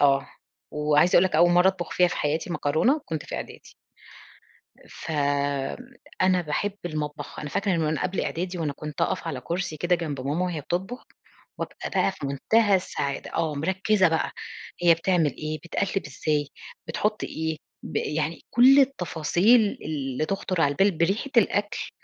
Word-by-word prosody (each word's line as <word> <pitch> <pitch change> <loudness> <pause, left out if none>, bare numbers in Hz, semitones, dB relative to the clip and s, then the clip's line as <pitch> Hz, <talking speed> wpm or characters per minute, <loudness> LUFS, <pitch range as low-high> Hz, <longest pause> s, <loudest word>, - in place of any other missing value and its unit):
آه. 140 -1 +4 0.4
وعايزة 150 +3 +3
أقول 175 - +6
لك 185 - -1
أول 175 0 +6
مَرّة 180 +2 +5
أطبخ 190 -2 -3
فيها 180 -1 +4
في - - -4
حياتي 155 +4 -1
مكرونة 175 - +1
كنت 160 -2 -4
في - - -6
إعدادي. - - -8 1.2
فأنا 145 - -1
باحب 170 +6 -2
المطبخ، 150 -2 -5
أنا 150 - -5
فاكرة 200 +6 0
إن - - 0
من 160 - +1
وأنا 155 -1 -1
قبل 185 0 -1
إعدادي 180 +2 -3
وأنا 155 -3 -1
كنت 150 +1 -8
أقف - - 0
على 140 -6 -3
كرسي 170 +1 -3
كده 175 +4 +1
جنب 155 -6 -3
ماما 145 +7 -1
وهي 175 -4 -3
بتطبخ، 190 - -4 0.5
وأبقى - - -5
بقى - - +1
في 185 -7 -6
منتهى 200 +10 +2
السعادة، 140 -6 -4
آه، 160 -2 0
مركزة 190 +5 +2
بقى 160 0 -1 0.5
هي 170 -1 +7
بتعمل 165 -4 +1
إيه، 155 0 -4
بتقلّب 190 +1 -2
إزاي، 145 +1 -1 0.4
بتحط 210 +6 -1
إيه، 160 0 -3 0.3
ب - - -6
يعني 155 +2 -2
كُلّ 260 +4 +7
التفاصيل 205 - +2
اللي 145 -1 -2
تخطر 190 -2 -2
على 145 -3 +4
البال، 195 +7 +3
بريحة 195 +11 0
الأكْل، 205 -2 +1
165 Hz, 160 wpm, -25 LUFS, 150-190 Hz, 1.2 s, هي